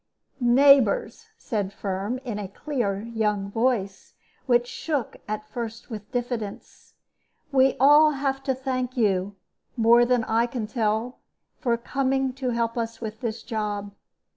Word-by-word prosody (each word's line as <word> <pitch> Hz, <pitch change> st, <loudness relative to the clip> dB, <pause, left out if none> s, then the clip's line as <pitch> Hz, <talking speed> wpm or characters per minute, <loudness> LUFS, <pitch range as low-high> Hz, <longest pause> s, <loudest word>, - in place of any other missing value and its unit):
"Neighbors," 270 Hz, -, +4 dB
said 205 Hz, -6 st, -3 dB
Firm, 200 Hz, +4 st, -3 dB
in 220 Hz, -4 st, -3 dB
a 200 Hz, -, -4 dB
clear 205 Hz, -3 st, -2 dB
young 210 Hz, -3 st, -1 dB
voice, 225 Hz, -4 st, -1 dB, 0.3 s
which 240 Hz, -1 st, +4 dB
shook 285 Hz, 0 st, -3 dB
at 215 Hz, 0 st, -4 dB
first 225 Hz, +1 st, -6 dB
with 210 Hz, -1 st, -8 dB
diffidence, 240 Hz, -4 st, -5 dB, 0.6 s
"we 265 Hz, -1 st, +4 dB
all 295 Hz, +3 st, +7 dB
have 270 Hz, -1 st, -1 dB
to 265 Hz, -, +1 dB
thank 255 Hz, -1 st, -3 dB
you, 200 Hz, -3 st, +1 dB, 0.4 s
more 235 Hz, +1 st, +6 dB
than 245 Hz, -1 st, +2 dB
I 225 Hz, +2 st, +1 dB
can 240 Hz, -2 st, -4 dB
tell, 220 Hz, +2 st, -1 dB, 0.4 s
for 240 Hz, -5 st, +1 dB
coming 265 Hz, +2 st, 0 dB
to 260 Hz, -1 st, -3 dB
help 235 Hz, 0 st, -1 dB
us 230 Hz, 0 st, -4 dB
with 220 Hz, -1 st, -6 dB
this 230 Hz, -2 st, -4 dB
job. 210 Hz, -3 st, -3 dB
235 Hz, 140 wpm, -25 LUFS, 215-260 Hz, 0.6 s, all